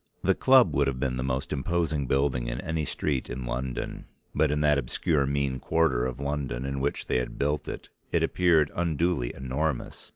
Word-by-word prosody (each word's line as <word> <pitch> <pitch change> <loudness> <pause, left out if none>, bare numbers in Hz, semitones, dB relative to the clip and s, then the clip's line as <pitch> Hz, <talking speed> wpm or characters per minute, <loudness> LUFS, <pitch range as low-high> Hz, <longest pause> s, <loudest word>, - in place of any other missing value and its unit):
The - - +4
club - - +5
would - - +2
have 65 -2 -2
been 65 -1 -1
the 65 - -2
most 65 +1 -2
imposing 75 0 0
building 65 -3 +1
in - - -3
any 80 -2 -2
street 70 -2 -2
in 60 0 -5
London, 60 +1 -4 0.3
but 80 - +2
in 75 +1 0
that 75 -1 +4
obscure 70 +3 0
mean 70 -2 0
quarter 70 -7 +2
of 65 0 -6
London 70 -3 -2
in 70 0 -2
which 70 +2 -1
they - - +1
had 60 - -3
built 75 +2 -1
it - - -6 0.2
it - - +2
appeared 85 -5 +3
unduly 85 -5 0
enormous. 65 +2 -3
70 Hz, 190 wpm, -27 LUFS, 65-75 Hz, 0.3 s, club